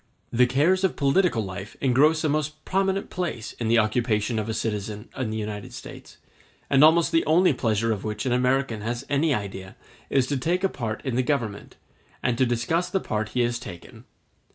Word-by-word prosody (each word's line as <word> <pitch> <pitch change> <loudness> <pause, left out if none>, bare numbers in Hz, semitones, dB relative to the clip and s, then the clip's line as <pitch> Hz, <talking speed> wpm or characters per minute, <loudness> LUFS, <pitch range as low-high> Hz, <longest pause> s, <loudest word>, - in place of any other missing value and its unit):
The 125 +1 +5
cares 160 +9 +2
of 190 - +1
political 140 - +2
life 95 +2 -8
engross 145 +5 +3
a 155 - +1
most 155 +1 -2
prominent 195 +1 0
place 165 -11 -4
in 115 - -1
the 115 +1 +4
occupation 110 0 +1
of 110 +1 -4
a - - -1
citizen 105 0 -3
in 130 -5 -2
the 110 - -3
United 105 -1 -5
States, - - -11 0.5
and 140 +1 +6
almost 165 +2 +5
the 165 -1 +3
only 170 +1 +4
pleasure 115 -2 0
of 105 -3 -2
which 105 -1 -3
an 130 - 0
American 125 -2 +1
has 120 +4 -3
any 145 +3 +2
idea 95 -5 -4 0.3
is 135 -2 +2
to 140 +2 -1
take 175 +8 0
a 195 - +3
part 115 -6 -5
in 125 -3 -1
the - - +4
Government, 120 -6 -2 0.5
and 120 - +1
to 130 - +4
discuss 120 +9 0
the 190 - 0
part 110 - -3
he - - +4
has 120 0 0
taken. 90 -7 -11
125 Hz, 200 wpm, -25 LUFS, 110-155 Hz, 0.5 s, and